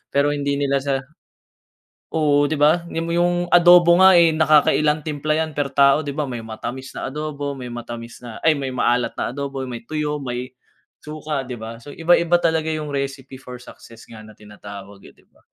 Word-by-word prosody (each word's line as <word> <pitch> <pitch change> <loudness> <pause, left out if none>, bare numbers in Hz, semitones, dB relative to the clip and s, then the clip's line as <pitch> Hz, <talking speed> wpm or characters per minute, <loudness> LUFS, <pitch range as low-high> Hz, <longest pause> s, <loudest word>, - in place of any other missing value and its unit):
pero 145 +1 +3
hindi 140 -1 -1
nila 140 -1 0
sa 135 0 -1 1.2
oo 145 -2 +3
di 155 - -2
ba. 155 +4 +2
Ni 165 -1 -4
mo 165 - -4
yung 175 +1 0
adobo 175 0 +6
nga, 190 0 +7
eh, 170 -1 +6
nakakailan 155 -1 +3
timpla 155 0 -2
yan 160 0 -1
per 145 -2 -3
tao 140 +2 +4
di 140 - -4
ba, 150 -1 -2
may 120 -2 -5
matamis 120 +4 -7
na - - -5
adobo, 145 -1 -4
may 125 - -7
matamis 120 0 -8
na 120 -3 -9
ay 160 - +5
may 135 -2 -4
maalat 125 -1 0
na 125 - -3
adobo, 140 -2 -4
may 120 -2 -7
tuyo, 150 +2 -3
may 125 0 -5 0.5
suka, 150 -2 -4
di 125 - -6
ba. 115 +1 -8
So, 145 - -11
iba-iba 170 +1 +3
talaga 160 -1 +1
yung 150 -1 -5
recipe 135 -1 -4
for 125 -1 -10
success 115 -2 -15
nga 110 -2 -11
na - - -14
tinatawag, 100 -1 -12
eh, - - -17
di - - -27
ba? - - -30
145 Hz, 195 wpm, -21 LUFS, 125-155 Hz, 1.2 s, nga